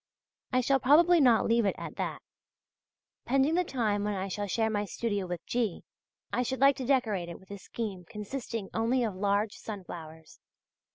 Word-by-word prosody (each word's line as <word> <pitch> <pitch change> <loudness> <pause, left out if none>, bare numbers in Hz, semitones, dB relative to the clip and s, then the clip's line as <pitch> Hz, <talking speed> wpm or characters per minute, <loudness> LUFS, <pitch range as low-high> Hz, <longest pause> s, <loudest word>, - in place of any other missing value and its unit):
I 255 -1 +3
shall 270 +2 +2
probably 325 +6 +6
not 245 -4 +5
leave 230 0 +3
it 200 - +1
at - - -7
that. - - -3 1.0
Pending 275 +4 +2
the 360 +2 +3
time 220 - 0
when 210 0 -1
I 190 +1 -3
shall 205 +2 -3
share 220 +3 0
my 205 -1 0
studio 205 -1 -2
with 175 -1 -5
G., 230 -7 -1 0.5
I - - +2
should 260 +1 -2
like 275 +1 +6
to 260 - -4
decorate 220 -10 +1
it 170 - -8
with 190 +1 -17
a 200 - -6
scheme 195 -3 -5
consisting 225 -1 -5
only 235 +3 +1
of 220 -4 -1
large 200 +2 +1
sunflowers. 165 -6 -9
220 Hz, 180 wpm, -30 LUFS, 200-255 Hz, 1.0 s, probably